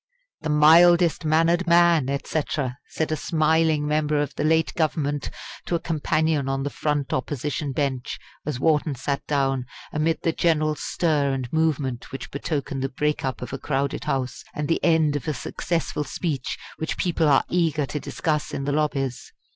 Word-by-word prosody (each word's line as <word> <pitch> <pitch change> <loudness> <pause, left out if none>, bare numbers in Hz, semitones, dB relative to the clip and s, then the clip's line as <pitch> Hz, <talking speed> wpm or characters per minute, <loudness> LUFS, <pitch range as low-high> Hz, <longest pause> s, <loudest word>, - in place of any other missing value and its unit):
"'The - - -3
mildest 165 +2 +6
mannered 165 +3 +3
man' 170 -5 +5
et 140 0 -2
cetera!" 140 -4 -2
said 160 -1 -2
a - - +2
smiling 155 -1 +2
member 150 0 +1
of 145 - -1
the - - -3
late 160 +1 +2
Government 145 -3 -1 0.4
to 175 - 0
a - - +1
companion 155 -3 0
on 135 0 -1
the 145 - -3
front 145 -2 -1
Opposition 145 +2 -2
bench, 130 -2 -2 0.3
as 145 -4 -3
Wharton 150 -1 +2
sat 140 +2 -2
down 135 -3 +1 0.3
amid 160 +2 0
the 165 - +2
general 155 -2 +2
stir 150 -2 0
and 130 -1 -4
movement 145 -6 0
which 135 -1 -7
betoken 140 -1 -3
the 135 - -1
break 150 +3 -1
up 130 -1 -3
of 125 - -7
a 135 - -3
crowded 140 0 -2
House, 130 -1 -2
and 150 -1 -2
the 165 - 0
end 160 -3 +3
of 145 - -4
a 155 - -1
successful 165 0 -2
speech 150 -2 -3 0.2
which 160 - -3
people 170 -3 +1
are 140 -2 +5
eager 160 -4 +1
to 150 - -4
discuss 150 0 -2
in 135 - -3
the 145 - -1
lobbies. 140 -4 -1
150 Hz, 175 wpm, -24 LUFS, 140-160 Hz, 0.4 s, mildest